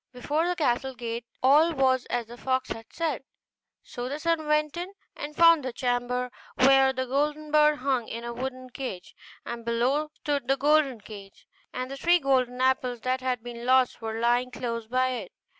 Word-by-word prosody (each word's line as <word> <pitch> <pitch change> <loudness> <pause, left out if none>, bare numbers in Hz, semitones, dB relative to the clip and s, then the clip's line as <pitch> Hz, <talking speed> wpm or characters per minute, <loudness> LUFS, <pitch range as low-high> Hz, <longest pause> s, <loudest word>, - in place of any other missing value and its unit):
Before 295 +7 -1
the 360 - 0
castle 265 -4 0
gate 235 -1 -5 0.2
all 300 +6 +5
was 260 -3 +2
as 240 -1 -2
the 235 +2 -11
fox 260 +1 -1
had 225 0 -6
said: 325 -5 -2 0.6
so 245 +1 -6
the 285 - -3
son 325 0 -1
went 300 0 +1
in 355 +3 -5 0.2
and 295 +1 -7
found 335 -3 +6
the 255 - -3
chamber 245 0 -1 0.2
where 270 0 +5
the 260 0 -3
golden 295 +3 -1
bird 300 0 +5
hung 260 -3 -1
in 230 +1 -6
a 235 0 -5
wooden 255 +1 -6
cage, 215 -9 -7 0.3
and 235 -1 -6
below 250 +6 0
stood 285 -4 -2
the 270 +1 +2
golden 285 -4 +2
cage, 200 -2 -12 0.3
and 255 +1 -5
the 275 - -5
three 345 +4 +4
golden 255 -4 +1
apples 255 -2 +1
that 255 +1 -1
had 250 -3 -2
been 240 -1 -8
lost 255 -1 +3
were 225 0 -4
lying 240 +2 +2
close 230 -3 -4
by 255 +2 +1
it. 235 -8 -5
255 Hz, 190 wpm, -27 LUFS, 245-290 Hz, 0.6 s, found